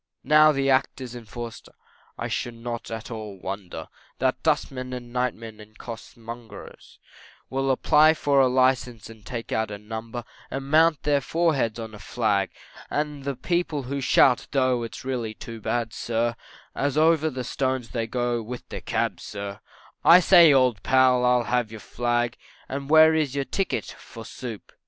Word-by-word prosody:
Now 155 +2 +6
the 135 -2 0
Act 135 +1 +1
is 125 -2 -7
in 120 -2 -9
force, 115 +2 -7 0.6
I - - -3
should 120 -1 -3
not 115 0 -6
at 115 0 -6
all 105 -4 -7
wonder 95 -1 -6 0.3
That - - 0
dustmen 130 -1 -1
and 120 -1 -8
nightmen 115 -3 -3
and 110 0 -15
costermongers 115 -2 -10 0.5
Will 135 0 0
apply 155 +4 +5
for 140 -2 +2
a 130 - +5
license 125 -3 +1
and 110 -2 -15
take 120 -1 -6
out 110 -1 0
a 105 - -6
number 110 +3 -6 0.3
And 135 +1 -5
mount 160 +1 +5
on - - -36
their 145 -1 +2
foreheads 145 -7 0
a 110 -2 -7
flag; 100 -2 0 0.4
And 150 -2 -3
the 140 -1 -2
people 160 +1 -1
they 140 +2 -4
shout, 125 -1 +4
tho' 130 -3 +2
it's 115 +2 -7
really 120 -5 -3
too 115 0 -9
bad, 115 0 -2
sir, 115 0 -1 0.4
As 140 +1 -1
over 160 0 +4
the 130 -3 -5
stones 130 -1 -2
they 115 -2 -3
go 120 -1 -1
with 120 +2 -8
their - - -6
cabs, - - -2
sir, 100 -1 -6 0.4
I 170 +2 +9
say, 175 -3 +7
old 130 -6 +3
pal, 130 -1 +4
I'll 125 -1 +3
have 120 -2 0
your 110 0 -9
flag, 120 +1 -1 0.3
And 140 +1 -5
where 160 +1 +7
is 150 -4 0
your 140 -1 -1
ticket 195 +6 -2
for 115 -1 -11
soup. 115 -2 -8
125 Hz, 170 wpm, -25 LUFS, 115-135 Hz, 0.6 s, I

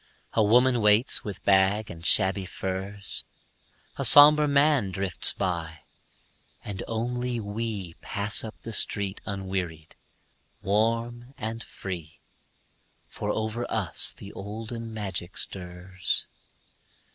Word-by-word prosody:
A 110 - +1
woman 120 +3 +2
waits 105 +4 +2
with 105 -2 -9
bag 100 +2 +1
and 85 -1 -12
shabby 95 +3 +1
furs, 95 +2 -4 0.7
A - - -3
somber 150 +1 +9
man 140 -6 +1
drifts 95 -1 +5
by, 85 -5 -5 0.8
and 100 -2 -7
only 120 +2 -4
we 105 -4 -6
Pass 100 +1 -1
up 110 -1 -9
the 115 - -7
street 100 -2 +3
unwearied, 95 -5 -6 0.7
warm 115 +5 -2
and 110 +1 -6
free, 85 -5 -9 0.9
For 105 - -6
over 110 +3 -4
us 100 -7 +3
the 100 - -13
olden 115 +3 -8
magic 95 -5 -6
stirs. 90 0 0
105 Hz, 110 wpm, -25 LUFS, 95-115 Hz, 0.9 s, somber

